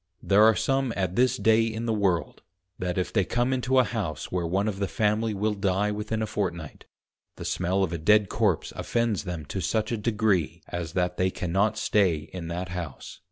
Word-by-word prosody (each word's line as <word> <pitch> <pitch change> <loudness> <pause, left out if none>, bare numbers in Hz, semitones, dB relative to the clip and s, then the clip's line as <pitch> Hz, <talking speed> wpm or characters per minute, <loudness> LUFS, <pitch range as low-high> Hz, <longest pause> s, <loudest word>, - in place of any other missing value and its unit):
There 100 +1 +4
are 110 0 +6
some 135 -2 0
at 95 -2 -1
this 125 +2 +3
day 110 +1 +4
in 115 0 -3
the 115 - 0
World, 95 -6 0 0.4
that 90 0 -2
if 90 - -2
they 100 - +3
come 120 +7 0
into 130 +1 +1
a 130 - +7
House 105 -11 -4
where 90 -2 -1
one 95 +5 0
of 100 -2 -3
the 100 - 0
Family 110 0 0
will 105 +2 0
die 100 +1 0
within 105 +1 -2
a - - 0
Fortnight, 85 -7 -4 0.5
the - - -8
smell 95 +2 0
of 85 -2 -1
a 85 - -3
dead 105 +5 +4
Corpse 100 -8 0
offends 115 -4 -1
them 85 -4 -5
to 95 +6 -4
such 110 +5 -1
a 115 - 0
degree, 105 - 0
as 85 -2 -4
that 90 -1 0
they 95 0 +2
cannot 95 +5 0
stay 100 -6 +2 0.2
in 90 -3 -5
that 90 +2 -4
House. 85 -5 -7
100 Hz, 205 wpm, -26 LUFS, 90-110 Hz, 0.5 s, a